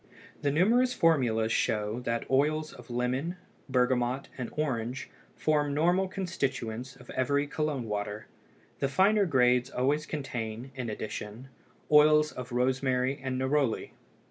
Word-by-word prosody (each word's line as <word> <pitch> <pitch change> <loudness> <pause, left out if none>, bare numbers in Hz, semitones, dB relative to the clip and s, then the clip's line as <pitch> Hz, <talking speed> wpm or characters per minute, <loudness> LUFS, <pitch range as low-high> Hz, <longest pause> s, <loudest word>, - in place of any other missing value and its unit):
The 145 - +1
numerous 235 - +3
formulas 120 -9 +2
show 105 +1 0
that 115 0 -1
oils 155 +3 +1
of 125 -1 -13
lemon, 130 +8 -1 0.3
bergamot, 125 0 +1
and 125 -3 -4
orange 125 -4 -2 0.2
form 150 -2 +1
normal 175 +5 +3
constituents 130 - -3
of - - -13
every 140 +3 +1
Cologne 145 -4 -2
water; 105 0 -3 0.5
the 140 - +1
finer 200 +5 +3
grades 125 -3 +3
always 145 +5 0
contain, 125 -4 -5
in 125 -3 -4
addition, 110 +3 -6 0.4
oils 150 0 +6
of 125 -1 -8
rosemary 130 +2 +1
and 130 -1 -2
neroli. 130 -2 0
130 Hz, 125 wpm, -29 LUFS, 120-150 Hz, 0.5 s, oils